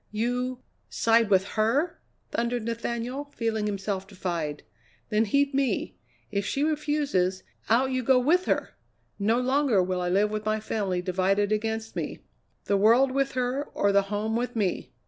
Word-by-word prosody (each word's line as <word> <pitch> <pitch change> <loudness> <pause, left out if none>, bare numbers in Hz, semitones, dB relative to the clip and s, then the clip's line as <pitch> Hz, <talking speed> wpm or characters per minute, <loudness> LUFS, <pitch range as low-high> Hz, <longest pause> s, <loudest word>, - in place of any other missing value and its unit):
"You 245 +3 -2 0.3
side 230 -1 +3
with 190 0 +3
her?" 270 +11 +1 0.3
thundered 235 0 -1
Nathaniel, 235 +4 -3
feeling 220 -2 -1
himself 195 -1 -3
defied. 170 -6 -4 0.5
"Then 215 0 +2
heed 280 +6 +2
me! 270 -1 0 0.4
If 200 -1 0
she 275 +8 -1
refuses, 290 -12 0 0.3
out 255 +4 +3
you 255 0 0
go 255 +1 +4
with 325 +9 +3
her! - - 0 0.5
No 220 +4 +2
longer 255 -5 +2
will 180 0 -1
I 180 - -1
live 205 +3 +2
with 215 0 -3
my 215 0 0
family 195 -4 -2
divided 195 +3 +1
against 220 +1 -2
me. - - -3 0.5
The 200 - +2
world 235 +6 +5
with 275 +1 0
her, 255 +3 -1
or 200 - +2
the 200 0 +5
home 215 +2 -1
with 245 +1 -2
me!" 200 -5 -1
225 Hz, 160 wpm, -27 LUFS, 200-255 Hz, 0.5 s, world